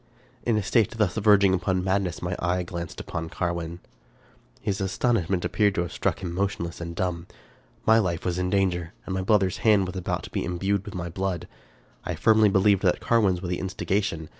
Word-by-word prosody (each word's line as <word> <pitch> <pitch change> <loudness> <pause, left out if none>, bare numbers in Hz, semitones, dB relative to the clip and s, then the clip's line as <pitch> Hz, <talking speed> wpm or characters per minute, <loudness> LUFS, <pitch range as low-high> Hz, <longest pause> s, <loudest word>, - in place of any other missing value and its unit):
In 115 -3 +1
a 105 - 0
state 105 +2 +3
thus 105 -5 +2
verging 100 -3 +5
upon 95 0 0
madness, 95 -2 -1
my 90 0 -2
eye 90 0 0
glanced 85 -1 -6
upon 80 0 -5
Carwin. 85 0 -3 0.8
His 95 -1 -2
astonishment 95 -2 0
appeared 100 -2 +2
to - - +1
have 85 - -4
struck - - -1
him 85 -2 -3
motionless 90 -2 -2
and 85 0 -5
dumb. 90 -1 -2 0.6
My 110 +1 +6
life 85 -6 -1
was 90 -1 -1
in 90 0 0
danger, 90 -3 0
and 95 - -4
my 95 - -1
brother's 95 -2 +2
hapd 105 -4 +4
was 90 0 -6
about 90 - -2
to - - -9
be - - -2
imbrued 95 +3 -1
in - - -6
my 85 0 -4
blood. 95 0 -3 0.6
I - - -3
firmly 110 -1 +4
believed 100 0 +3
that 90 -3 +2
Carwin's 100 -6 +2
was 90 - -3
the 90 - -1
instigation. 95 -3 -2
95 Hz, 195 wpm, -26 LUFS, 85-100 Hz, 0.8 s, My